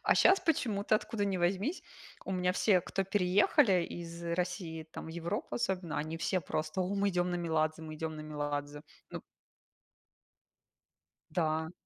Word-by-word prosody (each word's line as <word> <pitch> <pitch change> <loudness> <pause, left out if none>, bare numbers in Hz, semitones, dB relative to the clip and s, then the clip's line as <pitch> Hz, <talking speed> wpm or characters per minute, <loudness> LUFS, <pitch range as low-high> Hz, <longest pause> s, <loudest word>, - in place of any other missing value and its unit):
А - - +4
щас 385 - +6
почему-то, 220 -10 +1
откуда 210 -1 -2
ни 195 -2 0
возьмись, 195 - 0 0.4
у 190 - -3
меня 180 -1 +1
все, 190 -1 +4
кто 195 +3 -2
переехали 190 - +4
из 170 0 -7
России 170 -1 -2
там - - -7
в - - -7
Европу, 170 +6 -3
особенно, 185 -9 -1
они 155 +2 -3
все 185 +3 0
просто: 155 +2 -2
"О, 185 +2 0
мы 200 0 +2
идем 180 0 +1
на 175 - 0
Меладзе, 160 -2 0
мы 155 -1 -7
идем 160 0 -4
на - - -6
Меладзе!" 145 -1 -4 0.3
Ну - - -5 2.1
Да. 160 0 0
175 Hz, 155 wpm, -32 LUFS, 160-195 Hz, 2.1 s, щас